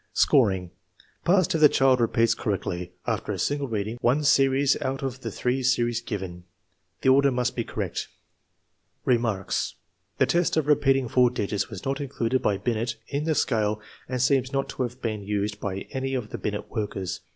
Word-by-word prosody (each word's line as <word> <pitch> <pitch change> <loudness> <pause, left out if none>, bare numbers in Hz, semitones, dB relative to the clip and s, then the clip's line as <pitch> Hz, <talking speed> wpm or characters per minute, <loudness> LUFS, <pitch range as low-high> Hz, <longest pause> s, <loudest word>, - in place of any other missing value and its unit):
Scoring. 95 -10 +3 0.5
Passed 185 0 +3
if 160 - 0
the 150 - +9
child 130 -2 +3
repeats 115 0 +3
correctly, 90 -5 -3
after - - -2
a - - -3
single 145 -1 -1
reading, 110 +1 -3
one 135 +5 +2
series 135 -1 +4
out 135 +1 -2
of 130 -1 -3
the - - -4
three 125 +2 -1
series 120 -2 +1
given. 95 -6 -6 0.6
The 130 - +4
order 140 +1 +5
must 125 -1 -1
be 120 - -1
correct. - - -4 1.0
Remarks. 115 -6 0 0.4
The - - +4
test 170 +5 +1
of 155 - +2
repeating 135 -3 +3
four 125 +1 +4
digits 105 -4 -2
was 95 - -8
not 135 +2 -1
included 130 -2 -1
by 100 - +1
Binet 115 +2 -1
in 145 +1 -2
the 160 -1 +1
scale 110 -5 +1 0.3
and 130 -1 -2
seems 130 0 +2
not 135 -1 -1
to - - -5
have 125 +1 -4
been 110 -3 -2
used 105 +1 -2
by 95 -1 -3
any 135 0 -2
of 120 -4 -4
the - - -5
Binet 105 -1 -4
workers. 95 -4 -3
125 Hz, 180 wpm, -26 LUFS, 105-135 Hz, 1.0 s, the